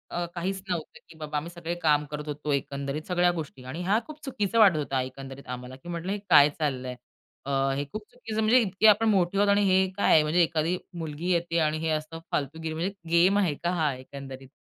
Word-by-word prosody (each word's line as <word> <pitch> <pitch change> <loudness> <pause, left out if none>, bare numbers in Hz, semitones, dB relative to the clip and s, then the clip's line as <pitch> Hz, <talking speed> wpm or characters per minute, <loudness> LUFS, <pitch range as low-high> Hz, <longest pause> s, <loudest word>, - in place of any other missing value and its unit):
अ, 175 - -1
काहीच 190 +2 -2
नव्हतं 170 -4 -4
की 165 - -14
बाबा 150 -1 -4
आम्ही 165 +4 -4
सगळे 170 -1 -5
काम 150 -1 +3
करत 150 0 -5
होतो, 150 0 -3
एकंदरीत 140 +1 -3
सगळ्या 180 -1 +3
गोष्टी 150 -6 -7
आणि 155 +7 -5
हा 205 +5 +3
खूप 305 -1 -10
चुकीचा 230 -4 0
वाटत 190 -7 +7
होता 135 -3 -1
एकंदरीत 135 +1 -8
आम्हाला. 125 +1 -9
की 135 +6 -12
म्हटलं, 170 +2 -3
"हे 205 - -1
काय 150 -3 +8
चाललंय? 130 -4 -2 0.5
अ, 140 - -3 0.2
हे 140 +1 -2
खूप 215 - -4
चुकीचं 225 -3 -4
म्हणजे 225 +4 +5
इतके 205 0 +2
आपण 215 +1 +5
मोठे 190 -1 +2
आहोत 205 0 +4
आणि 205 0 +3
हे 190 0 +4
काय 200 - +4
आहे?" 155 - +6
म्हणजे 155 +4 +2
एखादी 165 +2 0 0.2
मुलगी 160 +3 -3
येते 170 -1 +1
आणि 155 0 +1
हे - - +1
असं 155 +1 -3
फालतूगिरी 160 +3 -2
म्हणजे 175 +5 -2 0.2
गेम 180 +4 +5
आहे 180 -7 +2
का 175 - +1
हा 150 -3 +2
एकंदरीत 135 0 -10
165 Hz, 215 wpm, -27 LUFS, 145-185 Hz, 0.5 s, काय